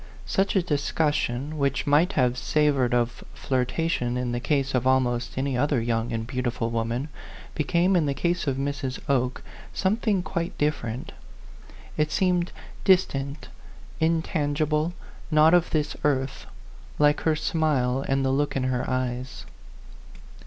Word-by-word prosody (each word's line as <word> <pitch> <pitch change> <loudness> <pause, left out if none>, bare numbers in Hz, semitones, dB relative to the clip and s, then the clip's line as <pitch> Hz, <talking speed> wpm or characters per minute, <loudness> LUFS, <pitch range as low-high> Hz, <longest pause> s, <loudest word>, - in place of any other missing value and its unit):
Such 195 +1 0
a 190 - +3
discussion, 145 -2 -1
which 140 -1 0
might 155 +7 +3
have 125 -3 +2
savored 140 -2 +2
of 120 0 0
flirtation 125 -1 -1
in 125 -1 -1
the 120 - -1
case 140 +1 0
of 125 0 +1
almost 125 -2 +1
any 135 0 0
other 140 +1 +2
young 115 0 -1
and 115 -1 -2
beautiful 120 -2 -2
woman, 115 +5 -2 0.4
became 170 +5 +2
in 165 -4 +3
the 140 - -1
case 175 0 -1
of 135 -1 0
Mrs. 135 -1 -3
Oke 125 -2 0 0.3
something 200 -1 +1
quite 170 -1 -3
different; 130 -6 -2 0.9
it 155 0 +1
seemed 180 0 +1 0.3
distant, 145 -7 +1 0.5
intangible, 155 -1 0 0.4
not 155 +1 +5
of 175 -1 +4
this 150 -1 -1
earth, 135 -2 0 0.5
like 150 0 +4
her 160 -1 +2
smile 150 -5 0
and 135 0 +1
the 130 - +2
look 145 +2 0
in 135 - 0
her 130 -1 -1
eyes. 130 0 -3
140 Hz, 140 wpm, -25 LUFS, 125-155 Hz, 0.9 s, not